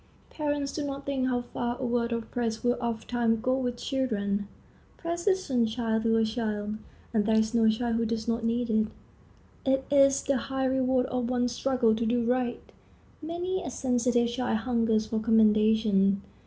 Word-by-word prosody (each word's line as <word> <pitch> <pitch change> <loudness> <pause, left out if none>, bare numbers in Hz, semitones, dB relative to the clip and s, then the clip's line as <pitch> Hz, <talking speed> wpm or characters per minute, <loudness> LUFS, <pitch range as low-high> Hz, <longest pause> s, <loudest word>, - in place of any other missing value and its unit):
Parents 290 -2 -2
do 300 - -3
not 275 -1 -5
think 270 -2 -1
how 245 -1 0
far 240 0 -4
a 260 - -2
word 240 -1 0
of 230 -1 -4
praise 225 -2 -2
will 245 0 +2
ofttimes 230 0 -1
go 255 +1 +2
with 245 -2 -2
children. 205 -7 -1 0.5
Praise 340 +2 -4
is 380 -1 +3
sunshine 230 -3 0
to 225 0 +2
a 225 - +3
child, 215 -2 -3 0.4
and 215 -2 +1
there 220 - +3
is 220 +1 +2
no 225 -1 +4
child 230 +1 0
who 230 - 0
does 225 0 -3
not 230 0 -1
need 235 +1 0
it. 220 0 +2 0.8
It 265 0 +1
is 275 -1 +5
the 275 - +1
high 265 +2 -2
reward 260 -1 +2
of 250 -2 -2
one's 245 -1 0
struggle 245 -2 +1
to 230 +1 -1
do 240 +1 +1
right. 245 0 0 0.6
Many 355 +4 -3
a - - -5
sensitive 245 -2 +1
child 245 -2 -1
hungers 225 -3 +1
for 220 0 -2
commendation. 215 -3 +3
240 Hz, 180 wpm, -28 LUFS, 225-260 Hz, 0.8 s, is